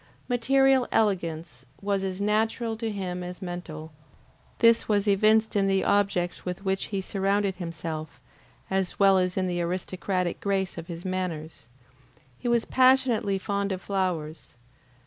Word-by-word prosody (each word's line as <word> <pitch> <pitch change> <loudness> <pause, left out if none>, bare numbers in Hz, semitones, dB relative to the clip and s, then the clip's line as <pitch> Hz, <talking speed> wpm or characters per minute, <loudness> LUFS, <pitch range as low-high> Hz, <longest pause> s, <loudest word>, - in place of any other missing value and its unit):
Material 265 +1 +3
elegance 170 - -1 0.2
was 200 -1 -1
as 190 0 -3
natural 220 +2 0
to 225 0 -3
him 185 -3 -4
as 180 0 -7
mental; 175 -3 -7 0.7
this 230 -1 +4
was 205 -1 +2
evinced 215 +2 +3
in 195 -1 +3
the 195 0 +2
objects 195 -3 +1
with 180 +2 -5
which 190 0 0
he 195 -2 -3
surrounded 195 +1 0
himself, 165 -3 -6 0.5
as 190 -1 -1
well 195 -1 +5
as 180 0 -1
in 190 - +1
the 175 -1 -1
aristocratic 180 +1 -2
grace 195 -2 -1
of 165 -1 -7
his 170 0 -7
manners. 170 -8 -4 0.7
He - - -4
was 235 -1 +2
passionately 255 -6 +3
fond 200 0 -2
of 185 - -2
flowers. 175 -8 -3
190 Hz, 145 wpm, -26 LUFS, 180-210 Hz, 0.7 s, well